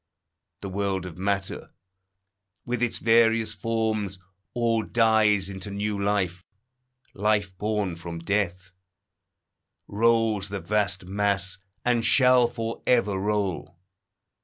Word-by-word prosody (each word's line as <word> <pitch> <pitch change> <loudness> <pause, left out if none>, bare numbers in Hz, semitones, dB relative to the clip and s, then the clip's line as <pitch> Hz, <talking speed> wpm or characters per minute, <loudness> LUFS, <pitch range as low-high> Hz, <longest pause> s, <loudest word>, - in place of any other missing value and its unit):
The 100 - -5
world 95 -1 -2
of 90 -1 -9
matter, 100 0 -3 0.9
with 125 -1 -2
its 120 -2 0
various 115 -1 +3
forms, 110 -4 -2 0.4
All 115 -2 +1
dies 110 -3 +3
into 95 0 -6
new 100 0 -3
life. 95 -3 -1 0.7
Life 105 -2 0
born 105 -4 -1
from 85 0 -7
death 90 0 -2 1.2
Rolls 110 -2 +1
the 100 0 -4
vast 100 -2 -1
mass, 100 0 0 0.3
and 120 -2 +2
shall 125 +1 +5
for 115 -1 -5
ever 110 -5 +3
roll. 100 -4 -2
105 Hz, 110 wpm, -25 LUFS, 95-115 Hz, 1.2 s, shall